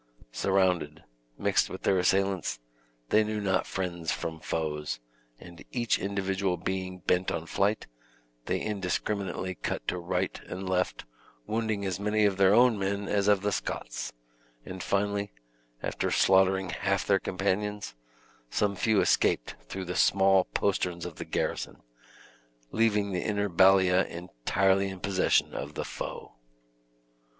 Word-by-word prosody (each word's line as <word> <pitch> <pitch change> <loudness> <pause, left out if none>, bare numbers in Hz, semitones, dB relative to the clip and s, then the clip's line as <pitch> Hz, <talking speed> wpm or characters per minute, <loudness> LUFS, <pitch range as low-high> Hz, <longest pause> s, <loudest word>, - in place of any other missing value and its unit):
Surrounded, 90 -1 +1 0.3
mixed - - +2
with - - -8
their 95 - +3
assailants, 95 -5 +1 0.5
they 110 +1 +5
knew 105 0 -2
not 95 -2 0
friends 85 -3 -3
from 80 -1 -4
foes, 75 -4 -3 0.4
and 85 0 -12
each 120 -2 +1
individual 95 -1 -1
being 95 +1 -3
bent 90 +1 +2
on 80 - -3
flight, 100 +5 0 0.6
they - - 0
indiscriminately 100 -1 -2
cut - - -4
to 90 - -1
right 90 +2 -2
and 95 +1 -5
left, 90 0 -1 0.4
wounding 110 -2 -1
as 95 0 -2
many 105 +1 +2
of 100 -2 +2
their 95 -1 +5
own 120 0 +5
men 100 +1 -1
as 100 -1 +1
of 105 -2 +4
the 105 - +1
Scots, - - -4 0.5
and 95 0 -7
finally, 100 -1 -1 0.5
after - - -1
slaughtering 95 0 +3
half 100 -1 0
their 95 -1 +3
companions, 100 +1 -2 0.6
some 100 +6 0
few 110 +1 +2
escaped - - +2 0.2
through 95 -1 -4
the 90 0 -4
small 95 -1 +4
posterns 90 -3 -1
of - - -7
the - - -5
garrison, - - -3 0.9
leaving 105 -3 +2
the 90 - -1
inner 105 -1 0
ballia 95 0 +5
entirely 95 +5 0
in 95 -1 -7
possession 95 0 +2
of 70 +2 -5
the - - -3
foe. - - -6
95 Hz, 140 wpm, -29 LUFS, 90-100 Hz, 0.9 s, they